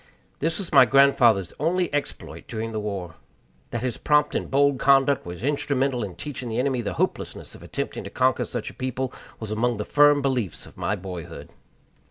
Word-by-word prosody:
This 165 +3 0
was 195 -4 -5
my 130 - +8
grandfather's 120 -8 +4
only 170 +2 0
exploit 145 -1 -4
during 115 0 -4
the 110 - -3
war. 100 -5 -4 0.6
That 120 0 -4
his 125 -3 -2
prompt 150 0 +2
and - - -2
bold 140 -1 +3
conduct 135 -4 +3
was 90 +4 -7
instrumental 135 -3 0
in 95 -4 -6
teaching 130 -5 -6
the 110 - -3
enemy 130 -1 0
the 115 - -3
hopelessness - - -3
of - - -13
attempting - - -5
to - - -6
conquer - - +1
such - - -5
a - - -18
people 130 0 -3 0.3
was 110 -2 -6
among 115 +2 0
the 105 - -3
firm 145 -1 +5
beliefs 125 - -1
of - - -15
my 100 - -1
boyhood. 90 -3 -8
125 Hz, 190 wpm, -24 LUFS, 110-140 Hz, 0.6 s, my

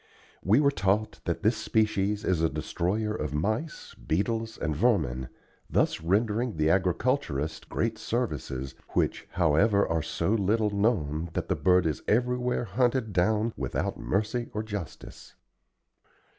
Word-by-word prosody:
We 105 +8 +4
were 140 -1 +4
taught 105 -3 0
that 85 +3 -2
this 110 +1 +3
species 105 -1 0
is 90 -3 +1
a 80 - +3
destroyer 105 +8 -1
of 75 -8 -3
mice, 110 - -2
beetles, 110 +6 -2
and 75 - -2
vermin, 60 -2 +1 0.4
thus - - +1
rendering 105 +5 0
the 75 +1 +3
agriculturist 90 - 0
great 110 -1 -1
services, 75 - -3 0.2
which, - - 0
however 95 +5 +3
are 80 0 0
so 95 - -1
little 105 0 +2
known 85 -7 0
that - - -3
the - - +2
bird 90 -1 +3
is 75 -4 -1
everywhere 125 +2 +1
hunted 120 -2 0
down 110 +5 +2
without - - -2
mercy 110 +5 -1
or 105 - -1
justice. 100 -6 -8
105 Hz, 135 wpm, -28 LUFS, 85-115 Hz, 0.4 s, We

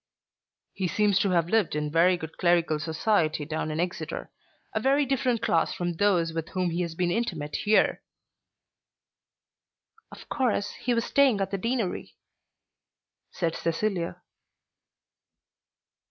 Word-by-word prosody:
"He 190 - -2
seems 205 +1 +2
to 200 - +2
have 170 -3 +2
lived 220 -8 +2
in 150 0 -2
very 175 +3 +4
good 160 -2 -8
clerical 170 -3 +2
society 160 0 0
down 155 +1 -3
in 155 +1 -3
Exeter, 175 +1 -3 0.4
a - - 0
very 280 +2 +3
different 250 -3 0
class 185 -4 +1
from 175 -2 -2
those 170 -3 +2
with 165 -1 -4
whom 185 -2 -1
he 170 +2 -1
has 170 -2 -3
been 175 0 0
intimate 170 -10 -2
here." 215 +1 +2 2.1
"Of - - -12
course 245 -7 0
he 245 -1 -2
was 230 - 0
staying 270 -7 +3
at 195 - -2
the 195 - -2
Deanery," 230 -2 -2 1.1
said 165 -3 -2
Cecilia. 170 +1 -2
180 Hz, 135 wpm, -27 LUFS, 165-215 Hz, 2.1 s, very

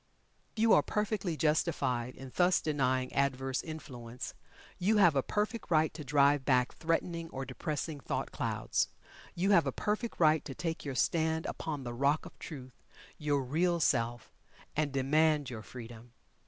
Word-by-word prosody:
You 225 0 +4
are - - +7
perfectly 210 -5 -1
justified 140 -6 0
in 130 0 -10
thus 180 0 +4
denying 130 -4 0
adverse 135 -1 0
influence. 125 -7 -7 0.5
You 210 +4 +3
have 175 -7 +6
a 135 - +4
perfect 215 - -2
right 160 -2 +3
to 155 0 -7
drive 140 0 +4
back 125 -2 +2
threatening 165 0 -1
or 135 -2 -5
depressing 150 +1 -4
thought - - -3
clouds. - - -1 0.5
You 190 +4 +2
have 170 -7 +5
a - - +1
perfect 215 - -2
right 155 -2 +4
to 135 - -7
take 165 -2 -3
your 140 -2 -4
stand 160 +2 +1
upon 150 -4 -4
the 120 -1 -5
Rock 140 +5 +1
of - - -12
Truth 130 -5 -9 0.4
your 145 -3 +1
Real 170 +6 +1
Self 120 -5 0 0.4
and 150 -1 +1
demand 145 +1 +2
your 110 -2 -6
Freedom. 120 0 -10
150 Hz, 155 wpm, -32 LUFS, 130-165 Hz, 0.5 s, are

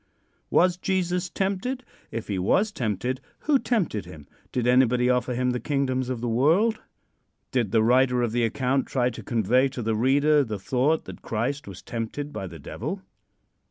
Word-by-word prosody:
Was 180 0 +3
Jesus 180 -1 -1
tempted? 200 +9 -2 0.3
If 115 0 -5
he 100 -3 -2
was 200 - +2
tempted, 125 - -2 0.2
who 295 -3 +3
tempted 185 - -1
him? 75 -2 -11 0.2
Did 125 -2 -1
anybody 125 0 +4
offer 125 0 0
him 125 +1 +1
the 125 - -2
kingdoms 130 -3 -1
of 125 -3 -3
the 120 - -2
world? 165 - +3 0.7
Did 120 -7 0
the 110 -1 +4
writer 125 +1 +3
of 120 - 0
the 120 +1 +1
account 130 +3 0
try 125 -2 +1
to 115 - -8
convey 120 +3 +2
to 130 -2 -5
the 110 0 0
reader 145 +5 +4
the 110 -5 -4
thought 130 +10 +1
that - - -10
Christ 125 +5 -2
was 95 -2 -9
tempted 120 +6 -4
by 95 - -4
the 85 -2 -9
Devil? 70 - -5
125 Hz, 175 wpm, -25 LUFS, 115-150 Hz, 0.7 s, anybody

